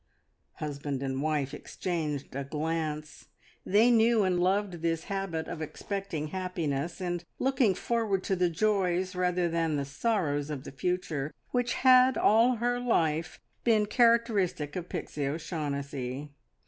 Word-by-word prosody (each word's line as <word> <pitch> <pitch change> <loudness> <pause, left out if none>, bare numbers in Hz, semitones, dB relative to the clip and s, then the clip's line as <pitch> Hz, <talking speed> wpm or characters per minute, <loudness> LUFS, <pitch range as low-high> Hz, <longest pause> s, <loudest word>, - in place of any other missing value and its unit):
Husband 140 -2 -4
and 135 0 -2
wife 150 -3 0
exchanged 150 -2 -4
a 140 - -2
glance. 155 +1 -3 0.4
They 220 +5 +4
knew 230 -1 +4
and 185 -2 +1
loved 185 -1 +1
this 165 -1 0
habit 195 -5 -3
of 160 - -5
expecting 160 -1 -4
happiness, 170 -4 -3
and 175 -2 -2
looking 255 -7 +2
forward 215 -3 0
to 190 - 0
the 180 -1 +2
joys 185 0 +1
rather 180 -1 +1
than 165 -2 0
the 140 -1 -1
sorrows 145 - -1
of 145 -3 -4
the - - -8
future, 155 0 -2 0.2
which 245 -1 +1
had 255 0 +6
all 230 +4 +5
her 245 +2 0
life, 165 -10 0 0.2
been 220 -3 +4
characteristic 215 - +2
of 180 -1 -5
Pixie 145 -2 -3
O'Shaughnessy. 140 -3 -4
175 Hz, 135 wpm, -29 LUFS, 150-205 Hz, 0.4 s, had